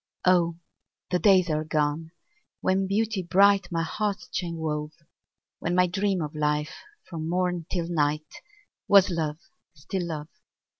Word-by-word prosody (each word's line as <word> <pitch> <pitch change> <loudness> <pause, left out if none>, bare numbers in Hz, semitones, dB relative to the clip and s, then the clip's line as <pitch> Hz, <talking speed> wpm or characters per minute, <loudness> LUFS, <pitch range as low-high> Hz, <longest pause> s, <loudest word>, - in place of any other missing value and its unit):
Oh! 175 -2 +4 0.6
the 180 - +2
days 190 -3 +5
are 155 0 0
gone, 155 0 -1 0.5
when 190 +1 +1
Beauty 215 0 0
bright 195 +1 +4
My 165 -1 0
heart's 205 +4 -2
chain 170 -2 -3
wove; 150 -1 -3 0.7
When 175 +2 -1
my 180 0 +5
dream 190 -1 0
of 150 - -5
life, 150 0 -1 0.3
from 160 -2 -5
morn 180 -2 -1
till 170 -3 -1
night, 150 -2 -1 0.5
Was 195 -1 +6
love, 155 -3 -2 0.4
still 175 +5 -4
love. 155 -2 -5
170 Hz, 140 wpm, -26 LUFS, 155-185 Hz, 0.7 s, Was